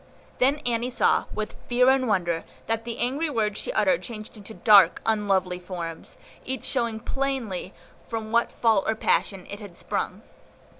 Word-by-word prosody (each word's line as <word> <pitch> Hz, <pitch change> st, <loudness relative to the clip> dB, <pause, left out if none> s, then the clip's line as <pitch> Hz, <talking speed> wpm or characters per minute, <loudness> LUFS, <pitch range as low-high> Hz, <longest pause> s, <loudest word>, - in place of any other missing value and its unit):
Then 270 Hz, +3 st, +3 dB
Annie 240 Hz, 0 st, 0 dB
saw, 250 Hz, -, +3 dB
with 215 Hz, 0 st, -4 dB
fear 250 Hz, +1 st, +5 dB
and 265 Hz, -1 st, +2 dB
wonder, 175 Hz, -5 st, 0 dB, 0.2 s
that 225 Hz, 0 st, -2 dB
the 235 Hz, -1 st, -4 dB
angry 275 Hz, +7 st, 0 dB
words 215 Hz, -6 st, -1 dB
she -, -, -3 dB
uttered -, -, +2 dB
changed 215 Hz, -2 st, -8 dB
to 220 Hz, -, -10 dB
dark, 205 Hz, -3 st, +6 dB
unlovely 195 Hz, -5 st, +1 dB
forms, 175 Hz, -3 st, -7 dB, 0.3 s
each 265 Hz, +1 st, -4 dB
showing 235 Hz, -4 st, 0 dB
plainly 245 Hz, -9 st, -3 dB, 0.4 s
from 220 Hz, -2 st, -4 dB
what 235 Hz, +1 st, +2 dB
fault 220 Hz, -4 st, +2 dB
or 220 Hz, -, +1 dB
passion 195 Hz, -3 st, 0 dB
it 200 Hz, -, -7 dB
had 200 Hz, -5 st, -10 dB
sprung. -, -, -3 dB
220 Hz, 160 wpm, -25 LUFS, 200-245 Hz, 0.4 s, dark